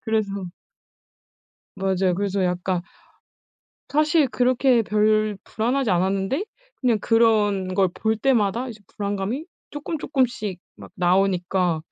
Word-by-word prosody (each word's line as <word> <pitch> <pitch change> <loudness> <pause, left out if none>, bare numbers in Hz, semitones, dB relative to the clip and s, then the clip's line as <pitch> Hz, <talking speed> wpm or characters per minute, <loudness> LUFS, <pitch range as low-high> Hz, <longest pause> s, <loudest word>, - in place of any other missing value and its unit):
그래서 200 -4 -1 1.3
맞아요. 190 -1 +1
그래서 200 -1 -1
약간 180 0 -1 1.1
사실 300 -1 +3
그렇게 250 0 +3
별 215 0 +2
불안하지 245 +1 -1
않았는데 195 - 0 0.4
그냥 240 -4 +2
그런 210 -5 +2
걸 190 -1 +3
볼 220 0 -1
때마다 235 -1 +1
이제 220 -2 -10 0.2
불안감이 205 +8 -2 0.3
쪼끔쪼끔씩 260 - -2 0.2
막 100 -1 -12
나오니까 180 -2 +1
210 Hz, 250 characters per minute, -23 LUFS, 190-245 Hz, 1.3 s, 사실